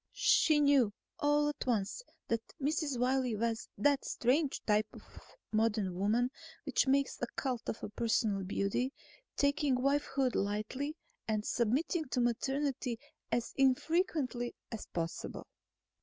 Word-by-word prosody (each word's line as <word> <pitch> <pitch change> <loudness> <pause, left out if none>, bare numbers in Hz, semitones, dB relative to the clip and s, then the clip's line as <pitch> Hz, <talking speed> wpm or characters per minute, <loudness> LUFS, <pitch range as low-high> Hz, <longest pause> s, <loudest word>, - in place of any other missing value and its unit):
She 310 -2 +4
knew, 280 -7 +4 0.3
all 295 0 +3
at 295 - -5
once, 225 - 0 0.3
that 230 -1 0 0.2
Mrs. 290 -1 0
Wiley 250 -1 +1
was 230 +1 -2
that 285 -1 +3
strange 270 +4 +1
type 210 0 +3
of - - -12 0.5
modern 215 -3 +1
woman 220 +7 +1 0.3
which 280 -1 +2
makes 275 +1 +2
a 245 - 0
cult 250 -4 -2
of - - -4
personal 220 -4 +1
beauty, 200 +7 -1 0.4
taking 285 -1 +2
wifehood 275 0 +1
lightly 215 +10 -2 0.3
and 215 -1 0
submitting 280 - +1
to 255 -1 -2
maternity 250 0 0 0.3
as 235 -1 -1
infrequently 270 -2 +1 0.2
as 225 - -6
possible. 165 -1 -4
250 Hz, 125 wpm, -33 LUFS, 225-280 Hz, 0.5 s, She